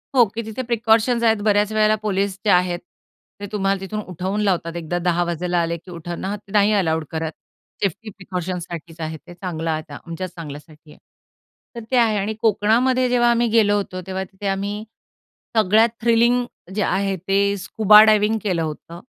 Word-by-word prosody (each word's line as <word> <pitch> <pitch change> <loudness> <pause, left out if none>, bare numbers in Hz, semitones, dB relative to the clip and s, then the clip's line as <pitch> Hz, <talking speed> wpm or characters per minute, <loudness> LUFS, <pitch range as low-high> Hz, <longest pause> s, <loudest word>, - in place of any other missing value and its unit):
हो, 245 - +7
की 225 +3 -5
तिथे 220 +3 -5
प्रिकॉशन्स 235 0 +2
आहेत. 225 -1 +4
बऱ्याच 210 0 +3
वेळेला 215 0 +3
पोलिस 200 -2 -1
जे 210 - +2
आहेत 180 -1 +2 0.6
ते 205 - -5
तुम्हाला 195 -2 0
तिथून 205 +3 -5
उठवून 190 +4 -2
लावतात. 175 -4 0
एकदा 170 +1 -3
10:00 175 0 +2
वाजायला 175 +1 -1
आले 170 0 -2
की 180 +3 -14
उठवण 170 +1 -6
हां, 205 +2 -2
ते 200 0 -19
नाही 210 0 +4
अलाउड 160 -6 +1
करत. 160 0 -3 0.5
सेफ्टी 205 +4 -2
प्रिकॉशन्ससाठीच 180 -4 -6
आहे 160 0 -4
ते 175 - -14
चांगलं 170 -3 -4
आता 155 -2 -5
आमच्याच 170 +2 -5
चांगल्यासाठी 150 -1 -10
आहे. - - -17 0.8
तर 235 - -6
ते 255 - +3
आहे 225 -3 +3
आणि 205 +2 -1
कोकणामध्ये 235 +4 +2
जेव्हा 240 -1 +3
आम्ही 235 0 +2
गेलो 215 -2 +4
होतो, 185 -2 -4
तेव्हा 190 0 -3
तिथे 190 +2 -7
आम्ही 200 +2 -2 0.7
सगळ्यात 220 +2 +5
थ्रिलिंग 235 +2 +3 0.3
जे 210 - 0
आहे 195 0 0
ते 200 +1 +2
स्कुबा 210 +2 +6
डायव्हिंग 215 0 +3
केलं 180 -5 0
होतं. 160 +2 -6
195 Hz, 175 wpm, -21 LUFS, 175-215 Hz, 0.8 s, हो